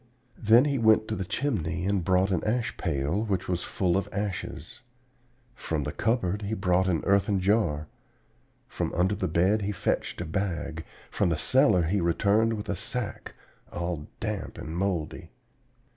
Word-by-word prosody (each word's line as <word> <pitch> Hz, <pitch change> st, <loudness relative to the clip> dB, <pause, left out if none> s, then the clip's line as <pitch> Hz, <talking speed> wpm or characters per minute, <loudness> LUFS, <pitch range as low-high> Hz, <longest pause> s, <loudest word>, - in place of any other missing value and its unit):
Then 115 Hz, +4 st, +6 dB
he 140 Hz, -2 st, 0 dB
went 110 Hz, -1 st, +4 dB
to 110 Hz, -, -1 dB
the 95 Hz, -, -2 dB
chimney 90 Hz, -, -2 dB
and 100 Hz, -2 st, +1 dB
brought 95 Hz, +2 st, +2 dB
the 95 Hz, -3 st, 0 dB
ash 115 Hz, +1 st, -1 dB
pail, 80 Hz, +3 st, -1 dB
which 95 Hz, -4 st, -1 dB
was 90 Hz, -1 st, -1 dB
full 90 Hz, -1 st, 0 dB
of 95 Hz, -, -1 dB
ashes; 100 Hz, 0 st, -4 dB, 0.7 s
from 80 Hz, -, -3 dB
the -, -, -3 dB
cupboard 105 Hz, -4 st, 0 dB
he 105 Hz, +2 st, -2 dB
brought 95 Hz, -1 st, +2 dB
an 85 Hz, -4 st, 0 dB
earthen 100 Hz, 0 st, +3 dB
jar; 90 Hz, -7 st, +1 dB, 0.8 s
from -, -, -3 dB
under 90 Hz, +3 st, +2 dB
the 95 Hz, -, -1 dB
bed 90 Hz, +6 st, +2 dB
he 100 Hz, +1 st, -1 dB
fetched 100 Hz, -, -2 dB
a 85 Hz, -, -3 dB
bag; 80 Hz, -2 st, -3 dB, 0.3 s
from -, -, +1 dB
the 80 Hz, -, 0 dB
cellar 105 Hz, -, +4 dB
he 95 Hz, +4 st, 0 dB
returned 100 Hz, +6 st, +2 dB
with 105 Hz, -2 st, -5 dB
a 100 Hz, -, -1 dB
sack, 120 Hz, -5 st, -4 dB, 0.4 s
all 85 Hz, -3 st, -4 dB
damp -, -, -4 dB
and 80 Hz, -, -6 dB
moldy. 85 Hz, -3 st, -2 dB
95 Hz, 165 wpm, -27 LUFS, 85-105 Hz, 0.8 s, Then